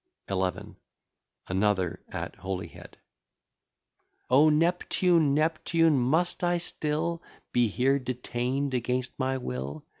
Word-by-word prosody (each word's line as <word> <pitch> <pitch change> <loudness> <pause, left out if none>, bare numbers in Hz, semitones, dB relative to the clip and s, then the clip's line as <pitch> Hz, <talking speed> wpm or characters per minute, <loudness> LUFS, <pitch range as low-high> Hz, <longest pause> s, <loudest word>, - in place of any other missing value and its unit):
XI. 95 -1 +1 1.0
ANOTHER, 95 -1 0
AT - - -5
HOLYHEAD 95 0 -7 1.3
O 145 +4 +6
Neptune! 165 -1 +2
Neptune! 160 -1 +2
must 160 +10 +1
I 175 0 +2
still 165 0 -2 0.3
Be 120 -1 +3
here 135 +6 +2
detain'd 125 +2 -2
against 125 +1 -1
my 130 0 0
will? 70 - -5
130 Hz, 95 wpm, -28 LUFS, 115-160 Hz, 1.3 s, O